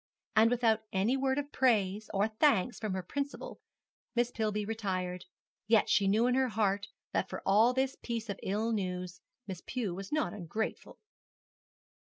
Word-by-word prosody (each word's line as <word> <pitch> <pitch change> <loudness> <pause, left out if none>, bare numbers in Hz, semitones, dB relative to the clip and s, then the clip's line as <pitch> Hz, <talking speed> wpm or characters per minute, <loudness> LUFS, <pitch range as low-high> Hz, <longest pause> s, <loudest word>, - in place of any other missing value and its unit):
And 220 +1 +6
without 230 -2 +2
any 210 +5 +2
word 265 0 +1
of 290 0 -3
praise 215 -5 +2
or 200 +1 +2
thanks 220 -1 +2
from 215 -4 -2
her 185 -1 -3
principal, 280 +9 -5 0.6
Miss 240 0 +2
Pillby 210 -2 -1
retired: 185 -5 -3 0.4
yet 225 -1 +4
she 200 - +4
knew 215 +4 +3
in 250 - +3
her 260 0 +3
heart 205 -3 0 0.2
that - - 0
for - - -6 0.3
this 265 0 +1
piece 230 -2 -3
of 200 - -4
ill 215 +4 -1
news 180 -4 -3 0.2
Miss 190 -3 -6
Pew 230 -8 -3
was 195 +2 -7
not 305 0 0
ungrateful. 210 +3 -4
215 Hz, 160 wpm, -32 LUFS, 195-245 Hz, 0.6 s, And